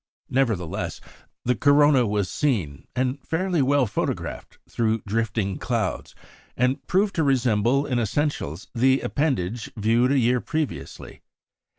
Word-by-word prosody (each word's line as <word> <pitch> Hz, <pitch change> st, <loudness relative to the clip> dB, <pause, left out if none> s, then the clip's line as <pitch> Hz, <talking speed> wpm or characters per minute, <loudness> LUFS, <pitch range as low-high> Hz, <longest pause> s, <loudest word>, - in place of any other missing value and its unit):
Nevertheless, 115 Hz, -11 st, -1 dB, 0.5 s
the 125 Hz, +1 st, +2 dB
corona 145 Hz, 0 st, +4 dB
was 105 Hz, -2 st, 0 dB
seen, 90 Hz, -, -1 dB
and 130 Hz, +2 st, -1 dB
fairly 175 Hz, -1 st, 0 dB
well 140 Hz, 0 st, +3 dB
photographed 105 Hz, -, -4 dB
through 110 Hz, -1 st, 0 dB
drifting 105 Hz, -2 st, -1 dB
clouds, -, -, -2 dB, 0.4 s
and 125 Hz, +2 st, +1 dB
proved 195 Hz, +2 st, +2 dB
to 160 Hz, -, +3 dB
resemble 130 Hz, -1 st, +2 dB
in 125 Hz, -4 st, 0 dB
essentials 115 Hz, -, -2 dB
the 130 Hz, +3 st, +3 dB
appendage 120 Hz, -, -1 dB
viewed 115 Hz, +4 st, +2 dB
a 140 Hz, -, +3 dB
year 125 Hz, 0 st, +2 dB
previously. 150 Hz, -, -5 dB
125 Hz, 120 wpm, -24 LUFS, 110-140 Hz, 0.5 s, corona